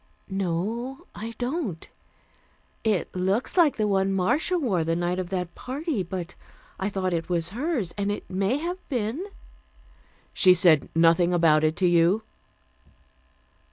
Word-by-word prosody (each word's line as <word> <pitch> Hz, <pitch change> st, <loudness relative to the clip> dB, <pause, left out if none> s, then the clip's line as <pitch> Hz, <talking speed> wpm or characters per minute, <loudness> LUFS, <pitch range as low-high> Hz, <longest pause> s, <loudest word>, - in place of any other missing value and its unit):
"No, 215 Hz, -, -3 dB
I 225 Hz, +2 st, -7 dB
don't. 245 Hz, -, -3 dB, 1.0 s
It 210 Hz, -6 st, 0 dB
looks 190 Hz, +6 st, 0 dB
like 335 Hz, -6 st, +4 dB
the 215 Hz, -1 st, +1 dB
one 195 Hz, -1 st, +1 dB
Marcia 225 Hz, -, +1 dB
wore 210 Hz, -, 0 dB
the 165 Hz, +1 st, 0 dB
night 175 Hz, +1 st, -1 dB
of 180 Hz, -2 st, -4 dB
that 180 Hz, -2 st, -3 dB
party, 275 Hz, -, -3 dB
but 180 Hz, 0 st, -5 dB, 0.5 s
I 195 Hz, -, -1 dB
thought 185 Hz, -2 st, -2 dB
it 165 Hz, +1 st, -2 dB
was 170 Hz, -2 st, 0 dB
hers, 240 Hz, -, -2 dB
and 200 Hz, 0 st, 0 dB
it 205 Hz, -, -5 dB
may 195 Hz, +7 st, 0 dB
have 350 Hz, +4 st, -4 dB
been." 245 Hz, -, -2 dB, 1.1 s
"She 185 Hz, -2 st, +6 dB
said 165 Hz, -5 st, +4 dB
nothing 170 Hz, +2 st, +4 dB
about 160 Hz, -3 st, +4 dB
it 155 Hz, 0 st, +2 dB
to 185 Hz, -, +2 dB
you?" 175 Hz, +5 st, +3 dB
190 Hz, 145 wpm, -25 LUFS, 175-240 Hz, 1.1 s, She